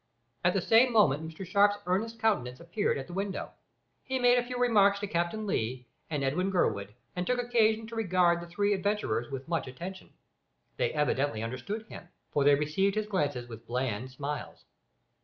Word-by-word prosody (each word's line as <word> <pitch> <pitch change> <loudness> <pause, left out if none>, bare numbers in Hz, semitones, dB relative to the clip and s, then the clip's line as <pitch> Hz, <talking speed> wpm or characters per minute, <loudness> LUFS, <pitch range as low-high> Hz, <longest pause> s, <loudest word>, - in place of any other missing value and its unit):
At 180 +2 +3
the 190 - +1
same 235 +5 +5
moment 160 - +3
Mr 165 +4 -8
Sharp's 200 +3 +4
earnest 215 +6 -1
countenance 165 - 0
appeared 170 +3 -1
at 135 - -5
the 175 - -10
window. 195 +1 -3 0.5
He 260 0 -2
made 245 -1 +5
a - - -1
few 250 0 -5
remarks 205 -5 +4
to - - -1
Captain 175 +3 -1
Lee 125 - -2 0.2
and 150 -3 -2
Edwin 170 +8 0
Gurwood, 105 - 0 0.2
and 180 0 -2
took 250 - +2
occasion 225 -2 +2
to 230 +1 -8
regard 180 -5 +2
the 170 - -8
three 205 +4 +1
adventurers 195 - -1
with 135 +1 -6
much 165 -5 -1
attention. 175 +9 -8 0.7
They - - +1
evidently 145 -6 0
understood 130 - -4
him, - - -10 0.2
for 145 - +2
they 145 0 +6
received 155 +8 +1
his 215 0 0
glances 145 -12 -1
with 115 -2 -11
bland 125 -1 -2
smiles. 145 +3 -6
180 Hz, 180 wpm, -30 LUFS, 140-210 Hz, 0.7 s, they